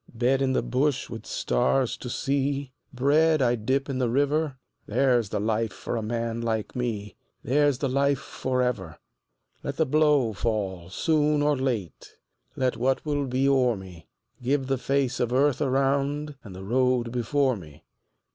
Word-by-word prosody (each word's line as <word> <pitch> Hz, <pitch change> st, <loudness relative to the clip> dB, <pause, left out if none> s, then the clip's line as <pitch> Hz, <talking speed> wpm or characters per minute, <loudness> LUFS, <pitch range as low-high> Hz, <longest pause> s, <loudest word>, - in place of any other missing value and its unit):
Bed 125 Hz, +3 st, +2 dB
in 130 Hz, -1 st, +2 dB
the -, -, +1 dB
bush 130 Hz, 0 st, 0 dB
with -, -, -7 dB
stars 115 Hz, -, +1 dB
to 125 Hz, -, -7 dB
see, 140 Hz, +1 st, -1 dB, 0.2 s
Bread 150 Hz, +4 st, +3 dB
I 125 Hz, -3 st, +3 dB
dip 130 Hz, +5 st, 0 dB
in 135 Hz, -2 st, -3 dB
the 125 Hz, -2 st, +1 dB
river 145 Hz, +2 st, +1 dB, 0.3 s
There's 125 Hz, -6 st, +2 dB
the -, -, -2 dB
life 110 Hz, +1 st, 0 dB
for -, -, -5 dB
a 115 Hz, -, -1 dB
man 115 Hz, +1 st, -2 dB
like 110 Hz, -2 st, -2 dB
me, 110 Hz, -5 st, -3 dB, 0.3 s
There's 145 Hz, +1 st, +2 dB
the 140 Hz, -, -1 dB
life 140 Hz, +1 st, +2 dB
for 130 Hz, -1 st, -2 dB
ever. 95 Hz, -10 st, -3 dB, 0.6 s
Let 140 Hz, -, -5 dB
the 160 Hz, -, +3 dB
blow 150 Hz, -5 st, +3 dB
fall 100 Hz, -5 st, -2 dB
soon 150 Hz, -, +2 dB
or 150 Hz, 0 st, +3 dB
late, 125 Hz, -, -3 dB, 0.4 s
Let 130 Hz, -1 st, 0 dB
what 130 Hz, +3 st, 0 dB
will 145 Hz, -2 st, -1 dB
be 130 Hz, +2 st, +1 dB
o'er 130 Hz, -4 st, +3 dB
me; 95 Hz, -4 st, -11 dB, 0.3 s
Give 135 Hz, +2 st, 0 dB
the 135 Hz, -1 st, -1 dB
face 130 Hz, -1 st, 0 dB
of 120 Hz, -1 st, 0 dB
earth 140 Hz, +2 st, +2 dB
around 140 Hz, +2 st, 0 dB
And 100 Hz, -4 st, -10 dB
the 95 Hz, -, -8 dB
road 125 Hz, +2 st, +1 dB
before 130 Hz, +2 st, +1 dB
me. 75 Hz, -7 st, -12 dB
130 Hz, 165 wpm, -26 LUFS, 115-140 Hz, 0.6 s, Bread